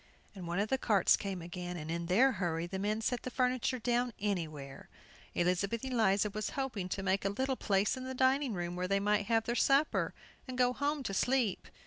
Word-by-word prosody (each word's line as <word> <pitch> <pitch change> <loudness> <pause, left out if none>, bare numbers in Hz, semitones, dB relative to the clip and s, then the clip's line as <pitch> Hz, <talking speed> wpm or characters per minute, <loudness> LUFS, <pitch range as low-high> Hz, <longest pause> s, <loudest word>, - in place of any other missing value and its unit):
And 185 -4 -8
one 170 +1 -2
of 205 +2 0
the 265 - +1
carts 205 -7 +4
came 190 -4 -5
again, 175 +1 -5
and 155 0 -5
in 170 0 -3
their 240 +10 +5
hurry 170 -6 -2
the 190 +2 -5
men 210 +2 -1
set 245 +2 -1
the - - -5
furniture 255 0 0
down 245 0 0
anywhere. 155 -9 -4 0.5
Elizabeth 195 +7 0
Eliza 210 -5 +2
was 215 +1 -3
hoping 235 -9 -2
to 195 - -3
make 195 +1 +1
a 195 - +1
little 260 +6 -1
place 200 -1 +1
in 260 - -6
the 260 0 -5
dining 260 -2 +2
room, 175 0 -3
where 180 +1 -2
they 195 +1 +2
might 205 0 +1
have 225 -1 +2
their 235 - -1
supper, 275 +4 +2 0.3
and 255 -1 -6
go 250 0 +3
home 290 +1 -1
to 200 - -3
sleep. 245 -1 +1
210 Hz, 210 wpm, -33 LUFS, 185-250 Hz, 0.5 s, their